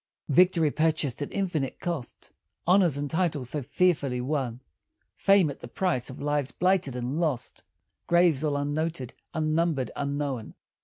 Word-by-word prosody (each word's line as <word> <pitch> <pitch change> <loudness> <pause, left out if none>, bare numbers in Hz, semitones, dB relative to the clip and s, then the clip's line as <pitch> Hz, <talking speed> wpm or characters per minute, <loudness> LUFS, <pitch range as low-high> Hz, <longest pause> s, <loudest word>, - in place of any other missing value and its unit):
Victory, 165 0 +4
purchased 155 -4 0
at 145 - -3
infinite 175 -9 -2
cost, 170 -9 -5 0.3
Honors 180 -5 +4
and 145 0 -2
titles 150 -6 -1
so 150 - -2
fearfully 145 -3 +1
won, 130 -2 -2 0.5
Fame, 195 -6 +4
at - - -11
the - - -8
price 130 -3 -1
of 130 - -9
lives 145 -1 -1
blighted 180 -8 +1
and 125 +5 -2
lost, 150 -8 -2 0.5
Graves, 170 -4 +4
all 145 -2 +1
unnoted, 145 -2 -2 0.2
unnumbered, 155 -3 0
unknown. 140 -4 -3
150 Hz, 140 wpm, -27 LUFS, 135-170 Hz, 0.5 s, Victory